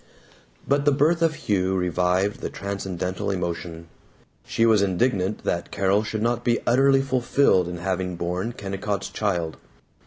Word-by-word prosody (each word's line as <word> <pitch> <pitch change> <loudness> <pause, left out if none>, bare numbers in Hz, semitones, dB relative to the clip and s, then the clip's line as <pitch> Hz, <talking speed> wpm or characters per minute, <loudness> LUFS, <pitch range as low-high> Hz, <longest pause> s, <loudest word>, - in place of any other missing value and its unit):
But 140 +1 +2
the 145 - +5
birth 155 +5 +2
of 165 -2 +2
Hugh 95 -6 0
revived 90 +2 0
the - - -3
transcendental 95 -2 -4
emotion. 85 -3 -4 0.6
She 115 - +2
was 110 -3 +4
indignant 100 0 0
that 85 - -2
Carol 100 +1 +2
should 110 0 -3
not 120 0 0
be 120 -1 +2
utterly 135 +2 +4
fulfilled 125 -7 +2
in 90 0 -5
having 90 0 -2
borne 90 +6 -2
Kennicott's 100 0 -4
child. 85 -6 -2
100 Hz, 145 wpm, -24 LUFS, 90-120 Hz, 0.6 s, the